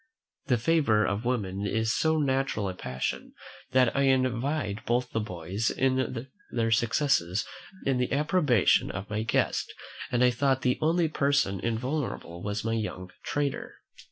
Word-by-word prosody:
The 125 -3 +3
favour 120 -5 +3
of 100 +4 -2
women 100 -5 -1
is 110 +2 0
so 160 0 +2
natural 135 -7 0
a 95 - -3
passion, 65 -7 -4 0.4
that 130 -2 +3
I 140 0 +3
envied 130 -3 0
both 120 +1 0
the 115 - 0
boys 95 +1 -2 0.8
their 115 -1 0
success 120 - +3 0.6
in 135 -2 +1
the 125 - 0
approbation 145 - +3
of 100 +1 -6
my 105 0 -1
guest; 110 - 0 0.4
and 125 0 +2
I 125 - +5
thought 130 +1 +1
the 125 0 +1
only 165 +2 +3
person 140 -10 +1
invulnerable 115 - -3
was 105 +2 -3
my 115 - 0
young 95 -5 -4
trader. 145 -1 -2
120 Hz, 145 wpm, -28 LUFS, 105-140 Hz, 0.8 s, I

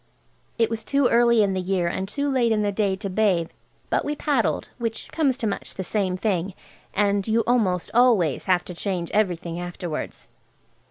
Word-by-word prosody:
It 230 - +3
was 225 -1 -3
too 280 +1 +2
early 235 -1 +4
in 195 -1 +1
the 185 - -1
year 180 -1 0
and 190 +2 -2
too 280 +8 -2
late 255 -4 +2
in 215 -1 +2
the 205 - +1
day 200 -1 0
to 200 +1 -5
bathe, 185 -4 +1 0.4
but - - +2
we 295 - -2
paddled, 285 -6 0
which 230 -1 -3
comes 280 -6 +1
to 240 - -3
much 205 - -3
the 190 - -4
same 185 -2 -1
thing, 190 -2 -1 0.4
and 200 -1 +1
you 225 +1 +3
almost 200 -8 +1
always 225 - +3
have 180 -2 +2
to 180 - -7
change 175 -1 -3
everything 175 -5 0
afterwards. 175 -2 -5
205 Hz, 185 wpm, -24 LUFS, 185-230 Hz, 0.4 s, early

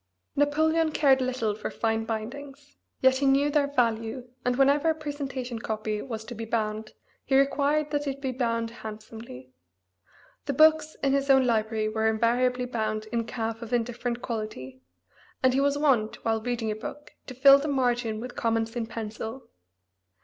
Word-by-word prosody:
Napoleon 315 +3 +2
cared 275 -3 +4
little 250 -4 -1
for 210 - -5
fine 225 -1 -1
bindings, 275 +6 -6 0.3
yet 260 0 +5
he 275 +1 +1
knew 280 +2 +3
their 290 -1 +2
value, 235 -2 -1 0.2
and 250 0 +1
whenever 280 +4 +3
a 320 - +2
presentation 275 -5 -5
copy 215 -1 -3
was 225 -4 -6
to 240 - -7
be 225 0 -6
bound 215 -1 -2 0.3
he 270 - +2
required 285 +2 +2
that 290 -1 -1
it 275 0 -3
be 270 -2 -2
bound 230 -2 -1
handsomely. 215 - -10 0.9
The 280 - 0
books 310 +1 +4
in 275 -1 +3
his 275 0 0
own 265 -1 +6
library 220 -2 +1
were 220 +1 0
invariably 245 +3 +1
bound 215 -3 -2
"in 230 -1 -1
calf 225 -1 -4
of 230 +1 -6
indifferent 240 0 -2
quality," 175 - -5 0.6
and 260 -1 +4
he 270 - +2
was 285 0 +2
wont, 260 -8 +1
while 225 -1 +1
reading 230 -2 -2
a - - -2
book, 295 +7 -8 0.2
to 255 - -8
fill 275 +2 +8
the 290 - -3
margin 245 -5 0
with 245 +2 -7
comments 225 0 -1
in 230 -2 -2
pencil. 225 +2 -6
245 Hz, 170 wpm, -27 LUFS, 225-275 Hz, 0.9 s, fill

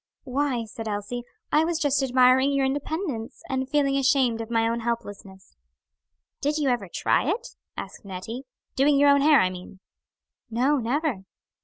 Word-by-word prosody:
"Why," 260 -3 -1
said 225 +1 -8
Elsie, 210 +4 -3 0.3
"I 305 - +4
was 335 0 0
just 290 -3 +1
admiring 260 +1 +4
your 275 -1 +1
independence, 285 - -3
and 265 0 -2
feeling 275 -1 +2
ashamed 260 -4 +2
of 225 - -7
my 225 -1 +2
own 230 +1 -1
helplessness." 205 - -6 0.9
"Did 295 +2 0
you 290 -3 +1
ever 235 -7 -1
try 275 - +1
it," 475 +7 -2 0.3
asked - - -7
Nettie; 200 +7 -7 0.3
"doing 280 +2 +4
your 285 0 +6
own 280 0 +4
hair, 295 -1 +6
I 185 -3 +2
mean?" 185 +1 -10 0.7
"No, 255 +6 +2
never." 250 - -1
260 Hz, 160 wpm, -25 LUFS, 225-285 Hz, 0.9 s, your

